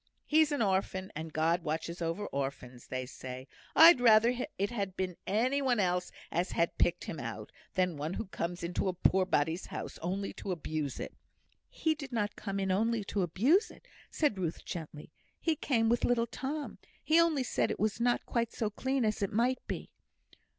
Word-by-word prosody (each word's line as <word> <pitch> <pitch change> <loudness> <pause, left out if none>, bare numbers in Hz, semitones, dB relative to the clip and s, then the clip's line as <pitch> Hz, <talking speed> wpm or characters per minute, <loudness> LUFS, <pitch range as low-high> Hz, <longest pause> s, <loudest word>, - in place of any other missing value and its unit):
He's 310 0 +4
an 285 -5 +1
orphan, 190 -1 0
and 160 +1 -5
God 165 +3 +2
watches 160 +2 -3
over 165 +5 -2
orphans, 135 -4 -5
they 130 0 -3
say. 130 0 -8 0.3
I'd 325 -5 +9
rather 230 0 +6 0.2
it 200 +3 0
had 200 -5 -3
been 185 -2 -2
any 250 +8 +2
one 255 -4 +2
else 180 -2 +1 0.2
as 175 +2 -1
had 170 - 0
picked 175 0 +2
him 160 - -5
out, 110 -3 -6 0.2
than 180 -4 +1
one 155 +5 -3
who - - -3
comes 175 -2 -4
into 175 +2 -1
a 185 - +1
poor 185 +1 +3
body's 160 +1 0
house - - -6
only 190 +4 -2
to 195 - -5
abuse 155 -4 -3
it." - - -5 0.6
"He 320 - 0
did 285 -4 -8
not 210 -3 -1
come 195 -1 -4
in 190 -1 0
only 225 +3 +1
to 200 0 -2
abuse 250 - +3
it," - - -16 0.2
said 290 -11 +1
Ruth, 170 -3 -3
gently. 155 -3 -7 0.3
"He 325 -2 +1
came 235 -6 +1
with 235 +1 +2
little 235 -1 +3
Tom; 275 +5 -5 0.2
he 320 +2 +5
only 315 -5 +2
said - - 0
it - - -3
was 215 +1 0
not 240 +1 +1
quite 235 -1 -1
so 215 -2 -2
clean 260 +3 0
as 215 -1 0
it 200 - 0
might 245 +4 +2
be." - - -5
195 Hz, 190 wpm, -32 LUFS, 170-240 Hz, 0.6 s, I'd